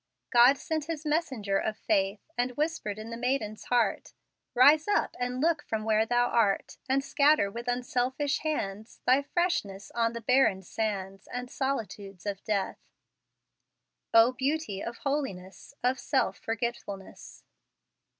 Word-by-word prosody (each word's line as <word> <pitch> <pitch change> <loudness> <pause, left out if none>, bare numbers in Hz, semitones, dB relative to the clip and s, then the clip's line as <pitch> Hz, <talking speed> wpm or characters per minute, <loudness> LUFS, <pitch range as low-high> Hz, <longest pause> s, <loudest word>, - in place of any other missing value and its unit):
"God 245 +3 +7
sent 315 +2 -3
His 320 -1 -5
messenger 260 -11 0
of 215 0 -2
faith, 200 -1 0
And 245 0 -1
whispered 300 -9 -1
in 220 +2 -7
the 230 - -5
maiden's 240 -4 -2
heart, 245 -2 0 0.4
'Rise 290 +5 +6
up 415 - +1
and 250 0 -2
look 320 +1 +2
from 220 -5 -3
where 220 0 +2
thou 245 +1 +3
art, 210 -4 +1
And 270 +1 +2
scatter 280 -7 +3
with 235 +3 -7
unselfish 250 +3 0
hands 220 -9 -4
Thy 260 +2 +5
freshness 280 - -2
on 230 -1 0
the 235 - -5
barren 225 -5 +3
sands 195 -1 -4
And 250 0 -5
solitudes 210 -8 -4
of 200 -1 -4
death.'" 200 -3 -2 1.3
"O 230 +2 +7
beauty 260 -5 -2
of 235 0 -5
holiness, 270 -7 -4
Of 250 +1 +1
self 190 - 0
forgetfulness!" 225 -4 -5
240 Hz, 140 wpm, -29 LUFS, 210-275 Hz, 1.3 s, God